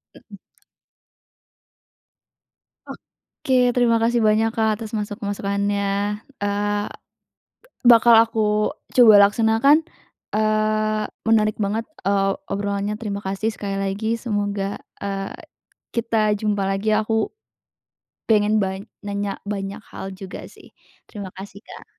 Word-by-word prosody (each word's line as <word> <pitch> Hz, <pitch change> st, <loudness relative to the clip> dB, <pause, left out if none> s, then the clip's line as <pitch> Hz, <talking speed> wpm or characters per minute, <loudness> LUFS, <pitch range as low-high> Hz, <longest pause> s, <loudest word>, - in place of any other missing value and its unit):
Mhm. -, -, -14 dB, 2.9 s
Oke 250 Hz, -2 st, +1 dB
terima 240 Hz, -2 st, +3 dB
kasih 235 Hz, +1 st, +2 dB
banyak, 220 Hz, +1 st, +3 dB
Kak, 220 Hz, -1 st, +2 dB
atas 220 Hz, -2 st, -6 dB
masuk 205 Hz, +2 st, -5 dB
masukannya, 200 Hz, 0 st, -1 dB, 0.2 s
eee, 205 Hz, 0 st, -1 dB, 1.0 s
bakal 235 Hz, -1 st, +7 dB
aku 215 Hz, -2 st, 0 dB, 0.2 s
coba 240 Hz, -4 st, +8 dB
laksanakan, 225 Hz, +9 st, +3 dB, 0.5 s
eee, 215 Hz, 0 st, +1 dB, 0.2 s
menarik 215 Hz, -1 st, +3 dB
banget, 210 Hz, +3 st, -1 dB, 0.2 s
eee, 195 Hz, 0 st, +2 dB, 0.2 s
obrolannya, 200 Hz, +1 st, -2 dB
terima 205 Hz, -3 st, -4 dB
kasih 195 Hz, +3 st, -2 dB
sekali 200 Hz, -1 st, -4 dB
lagi 200 Hz, +3 st, -1 dB
semoga, 205 Hz, -3 st, -2 dB, 0.2 s
eee, 195 Hz, -1 st, -4 dB, 0.6 s
kita 225 Hz, -2 st, +1 dB
jumpa 205 Hz, -2 st, 0 dB
lagi 205 Hz, +2 st, +1 dB
aku 220 Hz, 0 st, +1 dB, 1.0 s
pengen 215 Hz, -1 st, +3 dB
ban 190 Hz, 0 st, -4 dB, 0.2 s
nanya 200 Hz, -1 st, -3 dB
banyak 200 Hz, 0 st, -4 dB
hal 195 Hz, -, -7 dB
juga 190 Hz, -1 st, -9 dB
sih. -, -, -17 dB, 0.4 s
Terima 200 Hz, -4 st, -7 dB
kasih, 195 Hz, +1 st, -10 dB
Kak. -, -, -11 dB
210 Hz, 105 wpm, -22 LUFS, 200-220 Hz, 2.9 s, coba